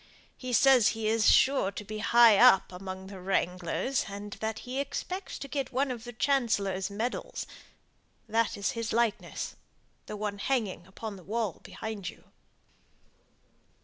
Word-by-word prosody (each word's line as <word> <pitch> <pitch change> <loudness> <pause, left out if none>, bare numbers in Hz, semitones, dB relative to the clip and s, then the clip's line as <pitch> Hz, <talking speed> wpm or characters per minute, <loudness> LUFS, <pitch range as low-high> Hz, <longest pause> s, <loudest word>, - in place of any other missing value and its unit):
He 255 -1 -6
says 255 -2 +6
he 220 -1 -2
is 220 0 +4
sure 265 -7 +4
to - - -6
be 215 +1 -6
high 230 0 +6
up 245 -7 +6
among 190 +1 -7
the 190 0 -9
wranglers, 180 +6 -1
and 205 +1 -7
that 220 0 -2
he 255 +2 -3
expects 365 +7 -4
to 275 - -7
get 275 -2 -3
one 265 +1 0
of 235 -2 -6
the 240 - -6
Chancellor's 215 -8 +1
medals. 240 - -3 0.8
That 225 +1 +1
is 200 - 0
his 230 -1 -3
likeness 230 -2 -1 0.5
the 210 - -5
one 205 -1 -3
hanging 210 -7 -1
against 200 +1 -7
the 185 - -13
wall 215 -1 -2
behind 215 -4 -6
you." - - -14
220 Hz, 150 wpm, -29 LUFS, 200-250 Hz, 0.8 s, says